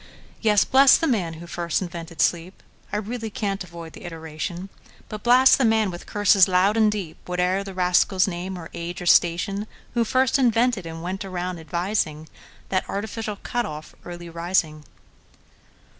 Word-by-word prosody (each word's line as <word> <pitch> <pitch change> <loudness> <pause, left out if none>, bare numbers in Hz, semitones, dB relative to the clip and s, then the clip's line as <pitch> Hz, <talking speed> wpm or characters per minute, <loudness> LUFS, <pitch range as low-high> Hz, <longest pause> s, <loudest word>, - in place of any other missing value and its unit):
Yes; 210 -2 +4
bless 270 +1 +6
the - - -1
man 195 - 0
who 165 +2 -10
first 170 -1 -2
invented 170 -2 -5
sleep(I 180 +4 -3
really 225 +2 -4
can't 200 -2 -3
avoid 170 -2 -10
the - - -12
iteration),But 170 +5 -8
blast 255 +3 +6
the - - +3
man, 220 -3 +2
with 175 - -9
curses 205 -2 +4
loud 190 +3 +3
and 220 -2 +4
deep, 190 -7 -5
Whate'er 180 +2 0
the 195 -1 -9
rascal's 185 +1 +3
name, 185 +1 -4
or 165 -2 -9
age, 170 +1 -5
or 180 - -6
station, 175 +5 +2 0.3
Who 240 -1 +2
first 260 +3 +2
invented, 235 -6 +2
and 165 0 -7
went 190 +3 -4
round 180 -2 -4
advising, 165 -2 -2 0.4
That 185 -1 -1
artificial 215 +1 -4
cut 240 +3 -3
off, 155 0 -8
Early 175 0 -8
Rising! 165 -3 -1
185 Hz, 160 wpm, -23 LUFS, 170-210 Hz, 0.4 s, bless